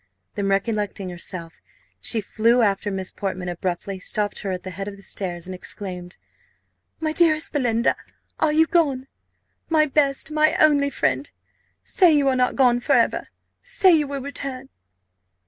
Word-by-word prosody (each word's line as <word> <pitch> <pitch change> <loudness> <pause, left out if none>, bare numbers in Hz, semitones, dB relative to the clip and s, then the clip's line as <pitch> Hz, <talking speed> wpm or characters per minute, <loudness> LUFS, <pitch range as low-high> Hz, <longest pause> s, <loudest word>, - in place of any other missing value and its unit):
Then 200 -1 -2
recollecting 200 -1 -1
herself, 170 -1 -6 0.4
she 225 - 0
flew 230 +4 +2
after 200 0 +1
Miss 190 -2 -4
Portman, 185 -2 -4
abruptly 180 +2 -4
stopped 205 +2 -1
her 200 - -4
at 185 -1 -4
the 185 - -6
head 195 +2 -6
of 200 -1 -7
the 200 - -13
stairs, 175 -4 -4
and 185 - -6
exclaimed, 180 -1 -8 0.8
"My 315 -1 -1
dearest 315 -1 +2
Belinda, 240 -5 +1 0.4
are 310 - +3
you 315 +1 +4
gone? 285 -7 +1 0.6
My 315 -2 +4
best, 280 0 +1
my 310 0 +3
only 285 -2 +4
friend! - - -1 0.5
Say 350 -5 +4
you 285 -2 +2
are 260 - +1
not 250 0 +1
gone 245 -3 +4
for 275 +4 0
ever! 240 -3 +2 0.3
Say - - +4
you 305 -3 +3
will 280 -1 -4
return!" 270 -1 -5
240 Hz, 160 wpm, -23 LUFS, 195-290 Hz, 0.8 s, you